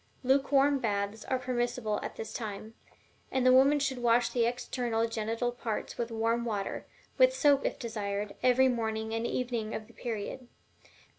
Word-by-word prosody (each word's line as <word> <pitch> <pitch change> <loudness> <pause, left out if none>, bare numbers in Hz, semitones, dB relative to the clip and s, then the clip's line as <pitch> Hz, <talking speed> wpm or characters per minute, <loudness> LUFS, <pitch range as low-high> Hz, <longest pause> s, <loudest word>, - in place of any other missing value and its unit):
Lukewarm 275 +1 +3
baths 205 -1 -2
are 260 - 0
permissible 240 -3 -1
at - - -6
this 220 - -6
time; 215 -1 -6 0.6
and 260 -1 +1
the 255 - +7
woman 275 +3 +6
should 270 -3 -1
wash 240 0 +3
the 235 -2 +2
external 240 -1 -1
genital 225 +2 -2
parts 235 -3 -4
with 235 -1 -1
warm 230 +1 0
water, 210 -4 -3 0.3
with - - +6
soap 285 - +4
if - - -4
desired, 205 -3 -3
every 255 +1 +5
morning 220 -2 -1
and 225 +1 -1
evening 235 -3 -2
of 220 - -5
the 235 - -19
period. 235 +2 -5
235 Hz, 160 wpm, -30 LUFS, 220-255 Hz, 0.6 s, the